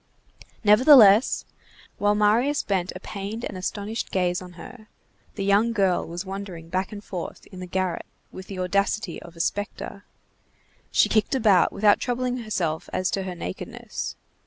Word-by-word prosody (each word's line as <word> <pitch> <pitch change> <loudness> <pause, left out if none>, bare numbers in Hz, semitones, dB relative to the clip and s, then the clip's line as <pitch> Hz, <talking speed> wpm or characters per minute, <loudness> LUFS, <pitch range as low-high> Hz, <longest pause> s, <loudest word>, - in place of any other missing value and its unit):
Nevertheless, 220 0 +7 0.5
while 205 0 +3
Marius 230 +8 +2
bent 190 -3 -1
a - - -6
pained 205 +4 -6
and - - -6
astonished 205 +4 -4
gaze 180 -1 0
on 180 -1 -10
her, 215 +6 -12 0.5
the 195 - -3
young 205 +4 +3
girl 195 -5 +1
was 175 +3 -5
wandering 190 -4 -7
back 185 +2 -2
and 205 -1 -8
forth 180 -5 -7
in 185 - -10
the 180 - -6
garret 185 -1 -2 0.2
with 185 0 -10
the 195 - -7
audacity 195 0 -1
of 170 0 -13
a - - -13
spectre. 200 +2 -3 0.9
She - - +4
kicked 215 +4 +1
about, 210 -8 +4
without 205 0 +4
troubling 250 0 -1
herself 185 -9 -2
as 185 0 -1
to 195 - -1
her 185 -1 -5
nakedness. 95 - -6
200 Hz, 160 wpm, -25 LUFS, 185-215 Hz, 0.9 s, Nevertheless